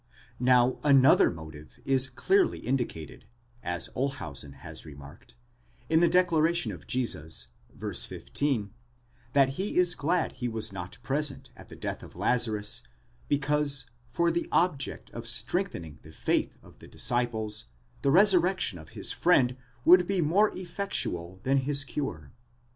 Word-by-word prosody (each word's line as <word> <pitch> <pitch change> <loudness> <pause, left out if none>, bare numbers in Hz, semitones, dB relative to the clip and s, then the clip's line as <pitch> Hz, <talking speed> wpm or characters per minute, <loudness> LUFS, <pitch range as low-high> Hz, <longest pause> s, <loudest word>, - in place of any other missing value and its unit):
Now 125 0 +3
another 140 -2 +6
motive 80 -2 -11
is 135 -1 +3
clearly 380 - +2
indicated, 120 - -4 0.4
as 90 -2 -1
Olshausen 80 - -4
has 70 - -10
remarked, 70 -4 -13 0.6
in 160 - +5
the 170 0 +4
declaration 170 -6 +2
of 85 -7 -11
Jesus, 100 -11 -2 0.2
* - - -24
y, - - -4
15, 105 - -2 0.6
that 135 -2 +4
he 200 +2 -2
is 180 -1 +4
glad 170 +2 0
he 125 - -4
was 110 -3 -3
not 90 -1 -7
present 140 +2 -1
at - - -14
the - - -11
death - - -5
of - - -13
Lazarus, 110 -4 +1 0.5
because, 145 -1 +1 0.2
for 170 +7 +1
the 170 +1 -2
object 150 -6 0
of 115 0 -6
strengthening 115 - +1
the 80 - -14
faith - - -1
of - - -18
the - - -13
disciples, 110 -3 -1 0.4
the 140 - +1
resurrection 180 - +4
of 80 - -13
his - - 0
friend 130 -8 +3 0.3
would 180 +1 +7
be 195 -2 0
more 180 +7 +3
effectual 170 - -2
than 135 +1 +2
his 140 +1 0
cure. 110 - -5
130 Hz, 140 wpm, -28 LUFS, 100-165 Hz, 0.6 s, would